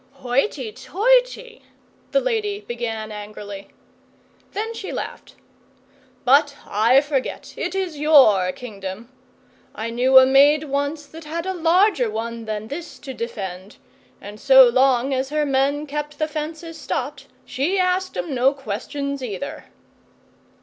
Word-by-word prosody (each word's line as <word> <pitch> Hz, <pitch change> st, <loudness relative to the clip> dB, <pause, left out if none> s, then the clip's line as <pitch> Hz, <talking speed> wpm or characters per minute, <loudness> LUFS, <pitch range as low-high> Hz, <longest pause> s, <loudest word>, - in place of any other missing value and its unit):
'Hoity 260 Hz, -, -1 dB
toity!' -, -, 0 dB, 0.5 s
the -, -, +3 dB
lady 435 Hz, -5 st, -2 dB
began 225 Hz, -, -5 dB
angrily. 205 Hz, -1 st, -8 dB, 0.8 s
Then 440 Hz, +3 st, -4 dB
she 405 Hz, -4 st, -6 dB
laughed. -, -, -7 dB, 0.9 s
'But 280 Hz, +2 st, +4 dB
I 230 Hz, +6 st, +4 dB
forget. 285 Hz, -3 st, -3 dB
It -, -, -4 dB
is 365 Hz, -6 st, -3 dB
your 260 Hz, -12 st, +5 dB
Kingdom. 205 Hz, 0 st, -8 dB, 0.7 s
I 230 Hz, +1 st, -4 dB
knew 255 Hz, +3 st, +4 dB
a 260 Hz, -, +9 dB
maid 280 Hz, +3 st, +5 dB
once 285 Hz, +1 st, -2 dB
that 320 Hz, +2 st, -12 dB
had 330 Hz, +3 st, -4 dB
a 380 Hz, -, -2 dB
larger 345 Hz, -, +3 dB
one 230 Hz, +1 st, -5 dB
than 215 Hz, 0 st, -4 dB
this 325 Hz, +4 st, -7 dB
to 270 Hz, -2 st, -8 dB
defend, 200 Hz, -5 st, -6 dB, 0.4 s
and 205 Hz, +1 st, -10 dB
so 265 Hz, 0 st, +8 dB
long 260 Hz, +1 st, +2 dB
as 265 Hz, +1 st, -1 dB
her 300 Hz, 0 st, 0 dB
men 280 Hz, +2 st, +1 dB
kept 295 Hz, 0 st, -5 dB
the 310 Hz, 0 st, 0 dB
fences 320 Hz, +2 st, -6 dB
stopped, -, -, -4 dB, 0.2 s
she 305 Hz, +9 st, -1 dB
asked 370 Hz, 0 st, 0 dB
'em 320 Hz, -, -3 dB
no 260 Hz, +2 st, +2 dB
questions 280 Hz, +3 st, -5 dB
either. 245 Hz, +4 st, -6 dB
275 Hz, 135 wpm, -22 LUFS, 235-320 Hz, 0.9 s, a